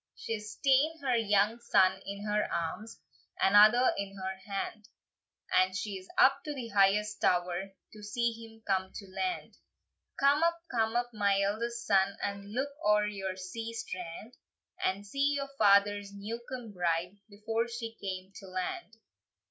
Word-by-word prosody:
She's 220 - -5
taen 280 +4 +4
her 255 -3 +2
young 210 0 +2
son 190 -4 +3
in 200 +1 -5
her 210 0 0
arms, 170 +7 -4 0.4
Another 215 +6 +6
in 200 0 -5
her 190 0 -4 0.2
hand, 210 +2 -4 0.6
And 185 0 +4
she's 195 -3 -5
up 275 +1 +5
to 300 -1 -4
the 245 -4 -5
highest 210 +1 +2
tower, 180 +2 +1 0.2
To 215 - -12
see 235 +3 0
him 225 -1 -12
come 190 -1 0
to 200 - -7
land. 360 - -3 0.6
"Come 280 +2 +4
up, 335 0 +2
come 225 -2 +1
up, 240 0 0
my 200 -2 +2
eldest 235 +4 -2
son, 195 0 +3
And 200 0 -4
look 265 +5 -1
oer 210 0 +4
yon 195 -3 -4
sea 225 +5 -6
strand, 185 +1 -6 0.5
And 195 +2 0
see 280 +7 +1
your 275 -1 -3
father's 205 -1 +4
new 205 +4 -6
come 245 -4 -6
bride, 180 +1 -1
Before 225 +3 -2
she 230 -1 -5
come 190 -1 -5
to 195 - -11
land." 210 - -4
210 Hz, 155 wpm, -31 LUFS, 195-235 Hz, 0.6 s, Another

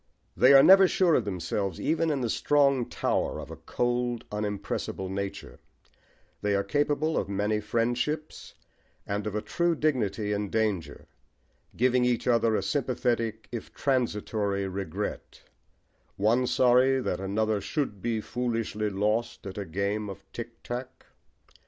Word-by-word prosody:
they - - +6
are 135 -1 +9
never 190 +4 +8
sure 180 -2 +3
of 120 - +2
themselves, 95 -1 -3
even 165 +1 +1
in 145 -3 0
the 120 - 0
strong 140 -4 +2
tower - - -1
of - - -8
a - - -6
cold 120 -1 -2
unimpressible 105 -2 -3
nature: 100 0 -5 0.8
they 105 -1 +1
are 100 - +1
capable 145 +7 0
of - - -1
many 105 +2 0
friendships 120 +8 -2 0.5
and 100 +1 -3
of 105 - -4
a 105 - -2
true 170 +9 0
dignity 110 -9 0
in 100 -1 -2
danger, 105 -6 -2 0.7
giving 125 +1 +3
each 125 -2 +1
other 115 -2 +3
a 95 - 0
sympathetic, 115 -1 -1
if 120 -2 -6
transitory, 105 -6 0
regret 95 -3 -5 0.7
one 115 +5 +2
sorry 130 +1 +4
that 90 -8 -2
another 105 +2 0
"should 100 0 -3
be 115 -2 -1
foolishly 115 -2 -2
lost 105 +4 -1
at 95 - -6
a 100 - -4
game 100 +4 -2
of 100 0 -9
tick 120 0 -8
tack." 125 +1 -6
115 Hz, 140 wpm, -28 LUFS, 100-125 Hz, 0.8 s, are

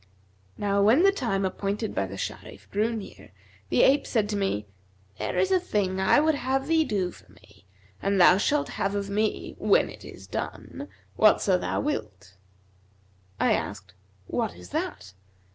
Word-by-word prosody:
Now 200 -1 +1
when 230 - +5
the 395 - +6
time 215 - -1
appointed 200 +3 -2
by 95 - -1
the 95 +1 -8
Sharif - - -7
drew 215 +3 +1
near, 195 - -9 0.4
the 125 - +4
ape 280 +2 +4
said 215 -4 +1
to 210 - -1
me, 195 - -1 0.5
'There - - -2
is 385 - +2
a 375 - +4
thing 200 - -1
I 190 - +4
would 315 +1 +3
have 270 -1 -1
thee 320 +1 +3
do 200 -9 -1
for - - -18
me; 100 -2 -22 0.3
and 195 0 +1
thou 180 +1 +7
shalt 285 +8 +1
have 195 +1 -2
of 200 0 -3
me 215 +1 -1
(when - - +3
it - - -13
is - - -11
done) 285 - -6 0.3
whatso 210 -3 +4
thou 180 - -1
wilt.' 105 - -4 1.0
I - - +3
asked, - - -4 0.3
'What 85 - -2
is 90 0 -13
that?' 95 - -4
200 Hz, 170 wpm, -26 LUFS, 185-265 Hz, 1.0 s, thou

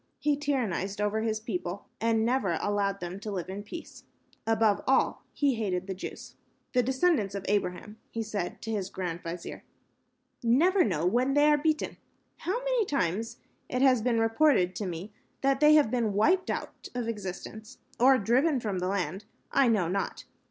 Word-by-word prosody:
He 295 -1 +1
tyrannized 235 -9 -1
over 210 +1 0
his 220 -1 -1
people 195 -4 -4
and 225 -1 +2
never 230 -9 +1
allowed 200 -1 0
them 175 +2 -5
to 210 - -6
live 185 -3 -4
in 195 +2 -5
peace. 325 +11 -10 0.4
Above 220 -2 +3
all, 265 0 +2
he 285 -2 +1
hated 190 -5 -2
the 195 - -4
Jews. 185 - -8 0.4
"These 250 -2 +3
descendants 260 - +1
of 195 -1 -5
Abraham," 205 +2 -2
he 230 - -3
said 205 -5 -4
to 225 - -3
his 200 -3 -2
grand 175 -3 -4
vizier, 170 0 -7 0.8
"never 335 +12 +4
know 170 -6 0
when 250 +8 +2
they 290 0 +5
are - - +6
beaten. 310 +1 0 0.4
How 380 +6 -2
many - - +2
times 230 - -1 0.3
it 255 +1 0
has 255 -4 +5
been 235 0 +1
reported 225 -5 +3
to 205 - -3
me 180 +4 -6 0.3
that 270 0 +2
they 300 +1 +7
have 290 -7 +4
been 235 -4 0
wiped 350 - +3
out - - -5
of 245 -2 -2
existence, 215 +2 -6 0.2
or 260 +2 +6
driven 255 +7 +2
from 205 -5 -2
the 180 - -1
land, 190 0 -2 0.3
I 275 -2 +4
know 210 -7 +2
not. 195 +3 -3
220 Hz, 175 wpm, -29 LUFS, 195-265 Hz, 0.8 s, they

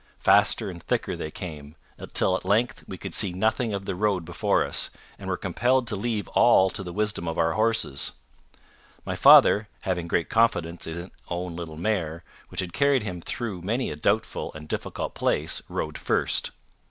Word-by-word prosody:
Faster 105 0 +3
and 85 -1 -10
thicker - - -1
they 75 - -5
came, 75 -3 -8 0.2
until 95 - +2
at - - -4
length 110 +7 +1
we 95 - -7
could - - -7
see 95 -4 +1
nothing 110 +4 0
of 100 -1 -4
the 95 - -2
road 95 -2 0
before 90 0 +1
us, - - 0 0.3
and - - -6
were - - -1
compelled 125 +2 +1
to 115 -3 -2
leave 105 -1 -2
all 95 0 +5
to - - -3
the 90 -2 -6
wisdom 105 -3 -1
of 80 - -3
our 80 0 +2
horses. 110 -10 +1 0.9
My - - -3
father, 105 +1 +7
having 90 -3 -2
great 85 0 0
confidence 90 -7 +1
in 80 - -4
his 85 +2 -7 0.2
own 90 0 -4
little 80 -2 -7
mare, 85 -4 -2 0.3
which 90 - -2
had 90 -2 -6
carried 140 -4 +3
him 90 -4 -5
through 105 -2 -4
many 115 +8 -1
a - - -4
doubtful 100 +9 -1
and 75 0 -9
difficult - - -4
place, - - 0
rode - - -4
first. - - +1
95 Hz, 185 wpm, -26 LUFS, 85-110 Hz, 0.9 s, father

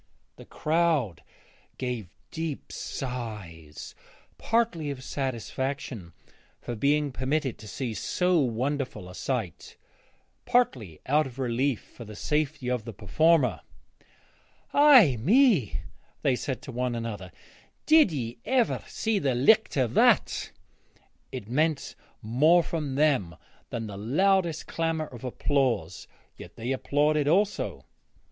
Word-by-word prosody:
The - - -12
crowd 155 - 0 0.6
gave 125 -7 -4 0.2
deep 160 -3 -5
sighs, 105 - -6 0.5
partly 225 -10 0
of 135 -2 -6
satisfaction 130 - -4 0.5
for 120 - -6
being 145 +4 +1
permitted 130 +1 -2
to 110 - -11
see 120 +1 -4
so 180 - +1
wonderful 130 -4 -2
a 90 - -10
sight, 110 - -4 0.7
partly 120 - 0
out 150 +2 +2
of 125 -1 -12
relief 130 0 0
for 120 - -12
the 105 -1 -10
safety 150 +2 -1
of 125 -3 -1
the 115 0 -7
performer. 125 - +2 1.1
'Ay 260 - +7
me,' 175 - +3 0.4
they 130 - +3
said 130 +1 -4
to 135 - -7
one 125 0 -2
another, 105 -6 -5 0.5
'did 310 - +6
ye 120 -5 -4
ever 255 -3 +1
see 220 -2 -1
the 135 -6 0
licht 215 - +4
o' 130 - +4
that?' 115 - +2 0.8
It 125 -6 -6
meant 150 +4 0 0.3
more 150 +10 +4
from 150 -5 -3
them 135 - +2 0.3
than 115 -1 -4
the 100 -2 -7
loudest 170 - +1
clamour 165 -1 -1
of 120 -5 -12
applause, 125 - -1 0.3
yet - - -11
they 120 +3 -4
applauded 145 +2 +1
also. 200 +6 0
135 Hz, 120 wpm, -27 LUFS, 115-155 Hz, 1.1 s, Ay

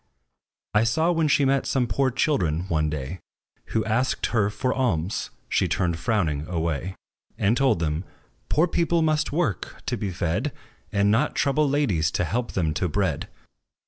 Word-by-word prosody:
I 105 +1 +4
saw, 160 +10 +2
when 165 -2 +2
she 145 -1 +3
met 135 0 +2
some 130 -2 +1
poor 135 +2 +1
children 120 - +1
one 75 -2 +1
day, 75 +4 -4 0.5
Who 110 -1 -1
asked 120 +4 0
her 105 -3 +3
for 125 +4 -1
alms, 100 -9 -1 0.2
she - - +1
turned 85 -3 0
frowning 85 -6 0
away; 85 +1 -2 0.4
And 100 +4 +2
told 135 -4 +3
them, 80 0 -1 0.5
"Poor 160 - +4
people 170 -1 +1
must 155 0 +1
work, 145 - -2
to - - -1
be 100 - -2
fed, 90 - -1 0.4
And 100 0 +3
not 120 +8 +2
trouble 145 +1 +2
ladies, 105 - +1
to - - +1
help 120 +8 -2
them 80 -5 0
to 90 +3 -1
bread." - - -1
105 Hz, 165 wpm, -25 LUFS, 85-140 Hz, 0.5 s, I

